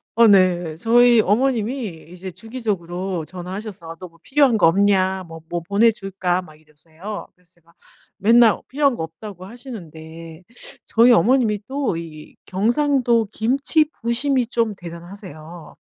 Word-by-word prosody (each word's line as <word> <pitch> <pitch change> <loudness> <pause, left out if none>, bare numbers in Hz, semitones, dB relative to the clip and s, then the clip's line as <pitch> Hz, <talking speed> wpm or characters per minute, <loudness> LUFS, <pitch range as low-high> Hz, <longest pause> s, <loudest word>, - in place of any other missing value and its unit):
어 230 0 +6
네 180 -5 +3
저희 235 +5 +5
어머님이 225 -4 -1
이제 180 +1 -8
주기적으로 190 -6 -4
전화하셔서 180 -1 -8
"너 185 - -8
뭐 165 -1 -24
필요한 270 0 +3
거 185 - +5
없냐. 190 +1 +2
뭐, 165 0 -10
뭐 175 0 -3
보내줄까." 195 -2 0
막 155 - -15
이러세요. 160 +6 -10
그래서 180 -1 -29
제가 170 0 -28 0.4
맨날 230 +1 +5
"필요한 280 -1 +1
거 - - -6
없다."고 180 +3 -9
하시는데 165 - -11 0.4
저희 235 +2 +4
어머님이 225 0 +3
또 270 -9 -2
이 155 -2 -10
경상도 235 +3 +1
김치 275 +7 +2 0.2
부심이 245 +2 +1
좀 230 -2 -1
대단하세요. 170 -2 -11
195 Hz, 300 characters per minute, -21 LUFS, 170-235 Hz, 0.4 s, 어